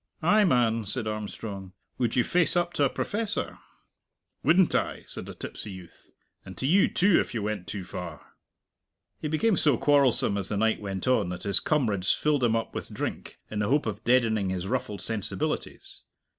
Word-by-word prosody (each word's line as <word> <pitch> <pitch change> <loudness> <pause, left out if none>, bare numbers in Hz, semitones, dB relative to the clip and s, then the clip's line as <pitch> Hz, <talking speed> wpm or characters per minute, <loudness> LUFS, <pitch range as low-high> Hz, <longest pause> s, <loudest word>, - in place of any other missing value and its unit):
"Ay, 210 +6 +5
man," 120 - +2
said 110 +3 -1
Armstrong, 105 -2 -6 0.3
"would 120 -3 0
you 125 - +4
face 175 +2 +3
up 175 0 0
to 145 - +1
a 140 - +3
professor?" 210 - -3 0.8
"Wouldn't 170 +4 +4
I?" - - -1
said - - -7
the - - -8
tipsy - - -7
youth; 90 -2 -13 0.3
"and 95 - -11
to - - -2
you, 185 +8 +4
too, 195 0 +3
if - - -3
you 110 - -2
went 105 -3 -3
too 95 -1 -5
far." - - -8 0.9
He - - -3
became 180 +7 +1
so 145 -6 +3
quarrelsome 135 -8 +3
as 95 - -4
the 105 - -2
night 110 +1 +1
went 100 +1 -4
on 110 -8 +2
that 90 0 -6
his 100 -1 +3
comrades 110 -12 +1
filled 150 -3 +1
him 115 -2 +3
up 115 - -2
with - - -6
drink, - - -5
in 105 - -3
the 105 0 0
hope 145 +2 +2
of 110 0 -4
deadening 115 -5 +2
his 95 -1 -3
ruffled 110 -3 -3
sensibilities. 110 -3 -3
115 Hz, 185 wpm, -27 LUFS, 100-145 Hz, 0.9 s, Ay